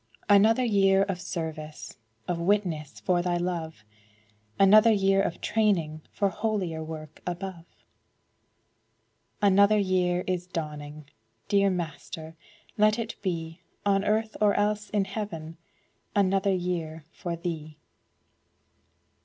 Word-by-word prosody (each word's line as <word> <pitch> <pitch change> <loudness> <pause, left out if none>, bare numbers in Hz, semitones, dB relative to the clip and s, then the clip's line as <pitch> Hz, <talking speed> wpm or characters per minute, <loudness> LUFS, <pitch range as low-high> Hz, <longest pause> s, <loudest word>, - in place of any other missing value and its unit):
Another 215 +4 +5
year 195 -4 +4
of 195 -3 -3
service, 160 -4 -6 0.3
Of 175 -1 -1
witness 170 -5 0
for 180 -2 +2
Thy 175 0 0
love; 165 -8 -4 0.7
Another 215 +4 +7
year 195 -2 +3
of 175 -3 -3
training 180 -8 +1
For 200 - +1
holier 190 -7 -2
work 155 -1 -9
above. 175 -1 -5 1.8
Another 200 +1 +5
year 180 -2 +1
is 180 -1 -2
dawning! 150 -3 -6 0.4
Dear 200 -1 +4
Master, 165 -2 -5 0.4
let 215 +1 +4
it 230 -1 -4
be 165 -3 -4 0.2
On 195 -1 +3
earth, 220 +1 0
or 205 -1 +4
else 210 0 0
in 205 -2 +1
heaven, 175 -6 -6 0.6
Another 195 0 +2
year 170 -4 -3
for 175 -1 -5
Thee! 160 -3 -5
185 Hz, 110 wpm, -27 LUFS, 165-200 Hz, 1.8 s, Another